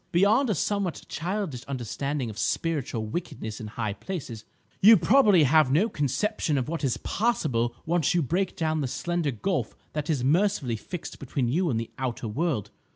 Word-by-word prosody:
Beyond 210 +9 +4
a 210 - +2
somewhat 200 0 -1
childish 175 - -3
understanding 135 0 -3
of 105 - -12
'spiritual 145 -9 -1
wickedness 110 -5 -5
in 110 - -6
high 110 -1 -3
places,' 120 - -6 0.4
you 220 +3 +9
probably 210 - +5
have 150 -1 +4
no 180 +11 +3
conception 150 - 0
of 130 - -1
what 165 0 -3
is 130 -3 +1
possible 135 - 0
once 170 0 +1
you 170 - +3
break 180 +7 -1
down 155 -1 0
the 135 - -1
slender 170 +4 -1
gulf 165 - -2 0.2
that 150 0 -3
is 140 -6 +1
mercifully 155 - +2
fixed 170 - -7
between 130 -2 -2
you 170 +6 +1
and 115 -5 0
that 115 - -6
Outer 120 -3 -3
World. 120 - -1
150 Hz, 170 wpm, -27 LUFS, 125-180 Hz, 0.4 s, you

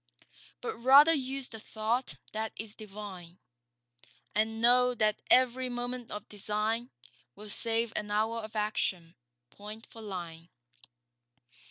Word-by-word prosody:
But - - -4
rather 275 +7 +7
use 270 -2 -1
the 225 - -8
thought 225 +4 -2 0.2
that 220 0 -3
is 215 -1 -4
divine; 195 -5 -10 1.0
And 220 +2 0
know 250 +1 +6
that 215 -2 +1
every 255 0 +4
moment 245 0 -4
of 210 0 -7
design 215 +3 -2 0.5
Will 210 0 -6
save 230 +1 +1
an 210 - -3
hour 220 +2 0
of 220 0 -9
action, 190 -5 -1 0.4
point 210 +2 -10
for 225 - -11
line. 170 -5 -7
220 Hz, 125 wpm, -30 LUFS, 210-245 Hz, 1.0 s, rather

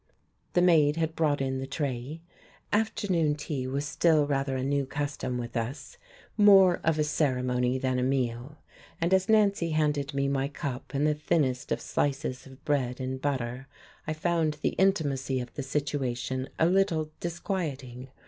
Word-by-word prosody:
The 175 - +4
maid 155 -4 +5
had 160 0 -1
brought 150 -3 +1
in 130 -1 -1
the 135 - -5
tray. 140 +1 -4 0.5
Afternoon 200 -8 +1
tea 140 -3 -4
was 140 +2 -2
still 155 0 +3
rather 135 -1 -1
a 130 - -2
new 140 0 0
custom 145 -3 -3
with 120 0 -6
us, 125 +6 -4 0.4
more 195 -4 +6
of 160 -1 +2
a 155 - +2
ceremony 125 -4 0
than 130 -1 0
a - - 0
meal; 130 +1 -1 0.4
and 170 +3 +1
as 190 +1 +2
Nancy 200 -5 +3
handed 145 -2 0
me 140 0 +1
my 135 0 0
cup 140 -2 -6
and 140 +2 +2
the 155 - +3
thinnest 145 -4 0
of - - +1
slices 135 -2 -2
of 135 0 -16
bread 130 -4 0
and 130 0 -4
butter 130 -2 -2 0.4
I 155 - 0
found 160 -1 0
the - - +3
intimacy 140 -9 +1
of 125 -1 -7
the - - -4
situation 135 -2 -2
a 160 - +3
little 170 -4 +2
disquieting. 145 -8 -4
145 Hz, 165 wpm, -28 LUFS, 130-160 Hz, 0.5 s, more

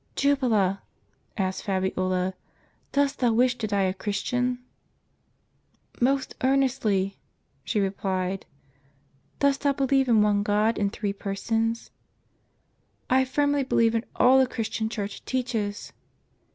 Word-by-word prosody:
"Jubala," 235 -9 +2 0.6
asked 190 -2 -1
Fabiola, 185 -1 -1 0.6
"dost 280 0 +1
thou 245 -2 +3
wish 245 +2 +3
to 215 - -1
die 200 -1 +1
a 185 -1 +1
Christian?" 245 +5 -1 0.7
" - - -33
Most 265 +2 +1
earnestly," 250 -8 +1 0.4
she 215 - -1
replied. 190 -1 -2 0.9
"Dost 280 0 +2
thou 285 -1 +2
believe 270 -1 +2
in 220 -3 +5
One 205 -1 +2
God 210 +2 +1
in 200 -1 +1
Three 200 0 -3
Persons?" 225 +3 -2 0.6
" - - -44
I 260 +1 +4
firmly 285 +2 +1
believe 230 -3 +2
in 230 0 0
all 260 +2 +6
the 260 - +4
Christian 220 -2 -3
Church 205 -2 -5
teaches." 230 -5 -3
225 Hz, 125 wpm, -26 LUFS, 200-260 Hz, 0.9 s, all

